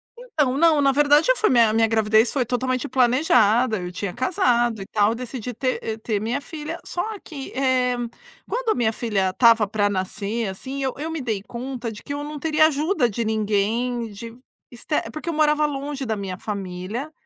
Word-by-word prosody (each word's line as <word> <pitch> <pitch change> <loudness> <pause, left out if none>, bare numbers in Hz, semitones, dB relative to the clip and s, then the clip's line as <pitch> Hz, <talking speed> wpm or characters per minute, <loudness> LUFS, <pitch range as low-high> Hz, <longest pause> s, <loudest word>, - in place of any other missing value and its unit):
Então, 310 - -1
não, 300 -4 +4
verdade 295 - +4
eu - - +2
fui 435 - +2
minha 230 -3 +4
minha 225 0 +3
gravidez 220 +1 +3
foi 260 -4 0
totalmente 255 +2 -1
planejada, 245 -4 +3
eu 180 0 -5
tinha 180 0 -4
casado 240 - +1
e - - -6
tal, 210 +1 +2
decidi 250 0 -6
ter 255 +3 -1
e 220 -1 -3
ter 220 -1 -2
minha 235 +5 -1
filha, 320 +2 -6
só 355 - -3 0.2
que, 280 -5 -8
eh, 255 -2 +1 0.5
quando - - -2
a - - +3
minha 225 -2 +1
filha 205 -5 0
estava 225 +1 +4
pra 205 0 +1
nascer, 205 +3 -2
assim, 260 +9 -5
eu 260 - -1
eu 315 +3 -4
me 320 - -3
dei 220 -6 -2
conta 240 0 -5
de 210 - -10
que 285 - -5
eu 290 - -4
não 295 0 -6
teria 310 0 +4
ajuda 305 -3 +1
de 230 +2 -2
ninguém, 220 +2 0
de 230 +3 -9 0.4
ester 255 +5 -3
porque 310 +2 -6
eu 335 - -1
morava 300 0 +3
longe 280 -1 -4
da 220 - -1
minha 195 -3 -5
família, 200 +7 -5
245 Hz, 190 wpm, -23 LUFS, 220-285 Hz, 0.5 s, não